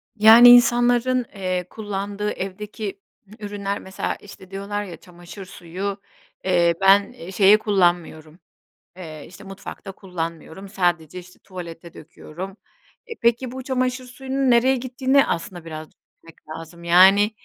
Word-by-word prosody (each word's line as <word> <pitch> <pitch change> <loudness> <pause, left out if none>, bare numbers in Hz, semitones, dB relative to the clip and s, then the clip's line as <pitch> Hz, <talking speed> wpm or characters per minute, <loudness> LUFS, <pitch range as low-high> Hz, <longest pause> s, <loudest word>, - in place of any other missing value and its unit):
Yani 225 +3 +8
insanların, 245 +1 +4
eee, 185 -2 -3
kullandığı 205 -1 -4
evdeki 200 +2 -6 0.4
ürünler 205 -1 -4
mesela 190 0 -4
işte 195 -2 -15
diyorlar 200 +1 -4
ya 180 -4 -9
çamaşır 175 +1 -12
suyu, 190 +3 -6 0.4
eee, 175 -2 +3
ben 195 0 +3
şeye 195 +2 +5
kullanmıyorum, 175 -6 -1 0.6
eee, 155 -5 -9
işte 190 +3 -14
mutfakta 195 0 -9
kullanmıyorum, 180 0 -7
sadece 175 -3 -1
işte 180 0 -16
tuvalete 170 -2 -10
döküyorum. 185 +5 -10 0.5
E, 460 - -6
peki 235 +1 +1
bu 260 +1 -7
çamaşır 255 0 -2
suyunun 265 +1 -2
nereye 250 +3 +4
gittiğini 260 +2 +1
aslında 170 0 -5
biraz 155 -1 -8
düşünmek 165 -1 -21
lazım, 165 +2 -10
yani 190 +5 +5
195 Hz, 125 wpm, -22 LUFS, 175-225 Hz, 0.6 s, Yani